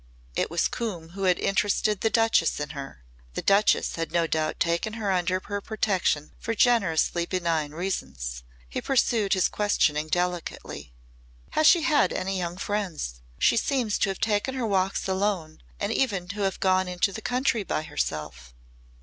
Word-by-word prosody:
It -, -, 0 dB
was 170 Hz, -, +1 dB
Coombe 185 Hz, -9 st, -4 dB
who 195 Hz, +3 st, -4 dB
had 180 Hz, -1 st, +4 dB
interested 205 Hz, +1 st, +1 dB
the 225 Hz, -, +3 dB
Duchess 225 Hz, -9 st, +2 dB
in 150 Hz, -, -4 dB
her. 135 Hz, -, -8 dB, 0.3 s
The -, -, -3 dB
Duchess 200 Hz, -2 st, +3 dB
had 165 Hz, 0 st, -3 dB
no 170 Hz, -1 st, +2 dB
doubt 155 Hz, -1 st, -1 dB
taken 170 Hz, +6 st, 0 dB
her 215 Hz, -3 st, -1 dB
under 185 Hz, 0 st, +1 dB
her 205 Hz, 0 st, -3 dB
protection 195 Hz, -8 st, 0 dB
for 230 Hz, -, -3 dB
generously 185 Hz, -7 st, +2 dB
benign 165 Hz, -5 st, -1 dB
reasons. 65 Hz, -, -4 dB, 0.3 s
He -, -, -4 dB
pursued 230 Hz, -6 st, +2 dB
his 185 Hz, -3 st, +3 dB
questioning 155 Hz, -7 st, +1 dB
delicately. 175 Hz, -, -3 dB, 0.6 s
"Has 310 Hz, -, +4 dB
she 335 Hz, -1 st, +6 dB
had 300 Hz, -2 st, +3 dB
any 190 Hz, 0 st, -2 dB
young 175 Hz, 0 st, -3 dB
friends? 180 Hz, -, -3 dB, 0.2 s
She -, -, +3 dB
seems 240 Hz, -4 st, 0 dB
to 195 Hz, -, +2 dB
have 195 Hz, -, -4 dB
taken 220 Hz, +4 st, 0 dB
her 255 Hz, -3 st, -1 dB
walks 195 Hz, -2 st, 0 dB
alone 190 Hz, -4 st, -1 dB, 0.2 s
and -, -, -1 dB
even 200 Hz, -9 st, 0 dB
to 205 Hz, +1 st, -4 dB
have 195 Hz, -2 st, 0 dB
gone 185 Hz, -1 st, +2 dB
into 180 Hz, +2 st, 0 dB
the 220 Hz, -, -6 dB
country 245 Hz, -3 st, 0 dB
by 155 Hz, -, -2 dB
herself." 75 Hz, -, -4 dB
185 Hz, 165 wpm, -26 LUFS, 165-210 Hz, 0.6 s, she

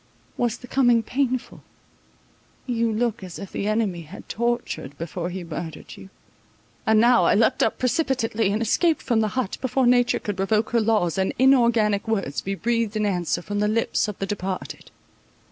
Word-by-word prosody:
Was 240 Hz, -1 st, -1 dB
the 250 Hz, -, -12 dB
coming 245 Hz, -3 st, +3 dB
painful? 255 Hz, +1 st, -2 dB, 1.0 s
You 230 Hz, -2 st, 0 dB
look 230 Hz, -1 st, -1 dB
as 180 Hz, -2 st, -8 dB
if 200 Hz, -, -8 dB
the 200 Hz, -, -3 dB
enemy 215 Hz, -5 st, 0 dB
had 155 Hz, -, -12 dB
tortured, 235 Hz, -, -3 dB
before 170 Hz, +1 st, -4 dB
he 180 Hz, 0 st, -5 dB
murdered 165 Hz, -1 st, -7 dB
you. 190 Hz, -, -13 dB, 0.8 s
And 220 Hz, 0 st, +5 dB
now 240 Hz, +1 st, +5 dB
I -, -, +4 dB
leapt 225 Hz, +4 st, +2 dB
up -, -, +1 dB
precipitately, 250 Hz, -6 st, 0 dB
and 215 Hz, +3 st, 0 dB
escaped 320 Hz, -, +1 dB
from 235 Hz, -3 st, +1 dB
the 220 Hz, -, +2 dB
hut, 250 Hz, -7 st, -2 dB
before 260 Hz, 0 st, +1 dB
nature 245 Hz, 0 st, +4 dB
could 205 Hz, -2 st, -5 dB
revoke 210 Hz, +3 st, +1 dB
her 235 Hz, -, +3 dB
laws, 210 Hz, -6 st, +1 dB
and 190 Hz, -, 0 dB
inorganic 235 Hz, -6 st, +3 dB
words 195 Hz, -10 st, -1 dB
be 195 Hz, +1 st, -3 dB
breathed 230 Hz, 0 st, -1 dB
in 215 Hz, -, 0 dB
answer 175 Hz, -3 st, -1 dB
from 205 Hz, +2 st, -3 dB
the 210 Hz, -, +2 dB
lips 220 Hz, 0 st, 0 dB
of 210 Hz, -, -5 dB
the 195 Hz, -, -2 dB
departed. 195 Hz, -2 st, -5 dB
220 Hz, 180 wpm, -24 LUFS, 195-240 Hz, 1.0 s, And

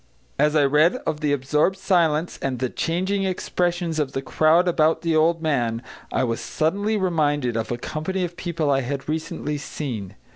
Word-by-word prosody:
As 150 Hz, +1 st, +3 dB
I 145 Hz, -2 st, +5 dB
read 150 Hz, -, +4 dB
of 155 Hz, -1 st, -1 dB
the 150 Hz, -1 st, 0 dB
absorbed 150 Hz, +7 st, +1 dB
silence 170 Hz, -4 st, +1 dB
and 135 Hz, -2 st, -1 dB
the 130 Hz, 0 st, -2 dB
changing 190 Hz, +4 st, -1 dB
expressions 175 Hz, -3 st, -1 dB
of 140 Hz, -3 st, -1 dB
the 135 Hz, -, -3 dB
crowd 160 Hz, +6 st, +3 dB
about 165 Hz, -2 st, +2 dB
the 165 Hz, -1 st, +1 dB
old 165 Hz, +1 st, +3 dB
man, 120 Hz, -6 st, 0 dB, 0.3 s
I -, -, +1 dB
was 115 Hz, -2 st, -1 dB
suddenly 200 Hz, +7 st, 0 dB
reminded 145 Hz, -, +1 dB
of 115 Hz, 0 st, -2 dB
a 120 Hz, -, -1 dB
company 160 Hz, +8 st, -3 dB
of 175 Hz, 0 st, -4 dB
people 165 Hz, -5 st, -1 dB
I 135 Hz, -1 st, +2 dB
had 135 Hz, +2 st, -4 dB
recently 150 Hz, -1 st, -3 dB
seen. 125 Hz, -9 st, -5 dB
155 Hz, 180 wpm, -23 LUFS, 140-175 Hz, 0.3 s, I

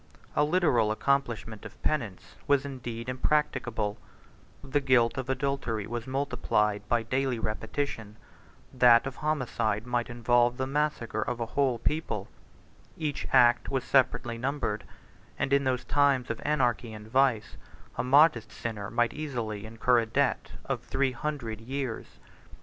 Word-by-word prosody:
A -, -, +4 dB
literal 150 Hz, -9 st, +3 dB
accomplishment 115 Hz, -3 st, -1 dB
of -, -, -11 dB
penance 100 Hz, -11 st, -2 dB
was 140 Hz, -1 st, +3 dB
indeed 120 Hz, -4 st, -6 dB
impracticable: 125 Hz, -6 st, -1 dB, 0.6 s
the 135 Hz, +2 st, 0 dB
guilt 125 Hz, -4 st, +3 dB
of 130 Hz, -1 st, -4 dB
adultery 130 Hz, -5 st, -1 dB
was 120 Hz, +2 st, -5 dB
multiplied 125 Hz, -6 st, 0 dB
by 120 Hz, -1 st, +2 dB
daily 130 Hz, +2 st, 0 dB
repetition; 110 Hz, 0 st, -3 dB, 0.6 s
that 120 Hz, -1 st, +6 dB
of 135 Hz, 0 st, -5 dB
homicide 125 Hz, -8 st, -1 dB
might 120 Hz, -1 st, -1 dB
involve 120 Hz, +1 st, +2 dB
the 130 Hz, -, -1 dB
massacre 135 Hz, -6 st, -1 dB
of 125 Hz, -1 st, -2 dB
a 115 Hz, -, -1 dB
whole 130 Hz, +1 st, +1 dB
people; 155 Hz, +7 st, -2 dB, 0.7 s
each 150 Hz, -3 st, -3 dB
act 120 Hz, -2 st, +5 dB
was 135 Hz, -1 st, -1 dB
separately 125 Hz, -3 st, +1 dB
numbered; 125 Hz, -5 st, -2 dB, 0.5 s
and, 135 Hz, -, 0 dB
in 140 Hz, 0 st, +3 dB
those 130 Hz, -1 st, 0 dB
times 140 Hz, -4 st, +2 dB
of 115 Hz, -, -5 dB
anarchy 125 Hz, -6 st, 0 dB
and 105 Hz, 0 st, -10 dB
vice, 130 Hz, -2 st, +1 dB, 0.4 s
a -, -, -1 dB
modest 135 Hz, -3 st, +4 dB
sinner 105 Hz, -3 st, -5 dB
might 120 Hz, +1 st, +1 dB
easily 115 Hz, -9 st, -4 dB
incur 115 Hz, +2 st, +2 dB
a 115 Hz, -, -2 dB
debt 135 Hz, +4 st, 0 dB
of -, -, -2 dB
three 135 Hz, -1 st, 0 dB
hundred 120 Hz, -5 st, -4 dB
years. 130 Hz, 0 st, -5 dB
125 Hz, 140 wpm, -28 LUFS, 115-140 Hz, 0.7 s, that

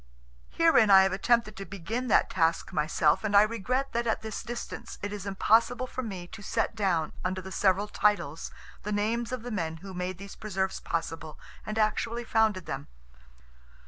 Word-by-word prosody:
Herein 325 Hz, -10 st, +4 dB
I 190 Hz, -1 st, +9 dB
have 190 Hz, -, +1 dB
attempted 230 Hz, +2 st, +2 dB
to 195 Hz, -, -5 dB
begin 205 Hz, +7 st, -4 dB
that -, -, +4 dB
task 165 Hz, -2 st, +1 dB
myself, 150 Hz, +3 st, +2 dB
and 205 Hz, -1 st, +3 dB
I 205 Hz, -, +9 dB
regret 235 Hz, +5 st, -1 dB
that 235 Hz, 0 st, 0 dB
at 225 Hz, -, 0 dB
this 220 Hz, -1 st, -4 dB
distance 235 Hz, 0 st, -6 dB
it 205 Hz, 0 st, -3 dB
is 205 Hz, -1 st, -6 dB
impossible 225 Hz, +5 st, +3 dB
for 255 Hz, -, -5 dB
me 195 Hz, -7 st, -6 dB
to 210 Hz, -, -10 dB
set 225 Hz, +2 st, -1 dB
down 180 Hz, -7 st, 0 dB
under 185 Hz, +1 st, -1 dB
the 190 Hz, +1 st, -8 dB
several 195 Hz, +1 st, +2 dB
titles 205 Hz, -8 st, 0 dB, 0.3 s
the 210 Hz, -, -4 dB
names 225 Hz, +3 st, 0 dB
of 255 Hz, -3 st, -4 dB
the 245 Hz, -, -5 dB
men 165 Hz, -6 st, -2 dB
who 195 Hz, -, -7 dB
made 180 Hz, 0 st, -3 dB
these 200 Hz, +1 st, -9 dB
preserves 190 Hz, -3 st, -2 dB
possible, 165 Hz, -2 st, -4 dB, 0.3 s
and 215 Hz, +1 st, -3 dB
actually 230 Hz, +2 st, 0 dB
founded 220 Hz, -6 st, +1 dB
them. 75 Hz, -, -5 dB
205 Hz, 180 wpm, -28 LUFS, 185-230 Hz, 0.3 s, I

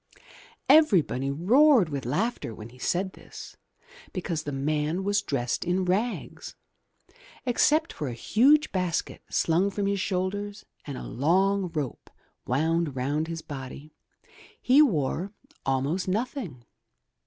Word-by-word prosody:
Everybody 180 Hz, -, +4 dB
roared 220 Hz, -, +4 dB
with 140 Hz, -5 st, -4 dB
laughter 185 Hz, -, -2 dB
when 110 Hz, +2 st, -9 dB
he 125 Hz, +2 st, -17 dB
said 185 Hz, +7 st, -1 dB
this, -, -, -11 dB, 0.6 s
because 175 Hz, -4 st, -3 dB
the 145 Hz, -, -5 dB
man 150 Hz, +5 st, -1 dB
was 205 Hz, +1 st, +1 dB
dressed 120 Hz, -4 st, -2 dB
in 180 Hz, +1 st, 0 dB
rags! 210 Hz, +7 st, -2 dB, 0.9 s
Except 305 Hz, +6 st, +2 dB
for 150 Hz, -, -4 dB
a 125 Hz, -, -4 dB
huge 285 Hz, -, +3 dB
basket 180 Hz, -3 st, -2 dB
slung 175 Hz, +5 st, +2 dB
from 200 Hz, 0 st, -2 dB
his 200 Hz, 0 st, 0 dB
shoulders 200 Hz, +2 st, -3 dB, 0.2 s
and 140 Hz, -3 st, -6 dB
a -, -, -7 dB
long 190 Hz, +6 st, +1 dB
rope 145 Hz, -5 st, -4 dB, 0.4 s
wound 160 Hz, +3 st, 0 dB
round 145 Hz, +5 st, -1 dB
his 165 Hz, -1 st, -5 dB
body, 140 Hz, +2 st, -8 dB, 0.7 s
he 265 Hz, +4 st, +5 dB
wore 185 Hz, -, +1 dB, 0.3 s
almost 140 Hz, +8 st, 0 dB
nothing. 200 Hz, -, -3 dB
175 Hz, 125 wpm, -27 LUFS, 145-205 Hz, 0.9 s, he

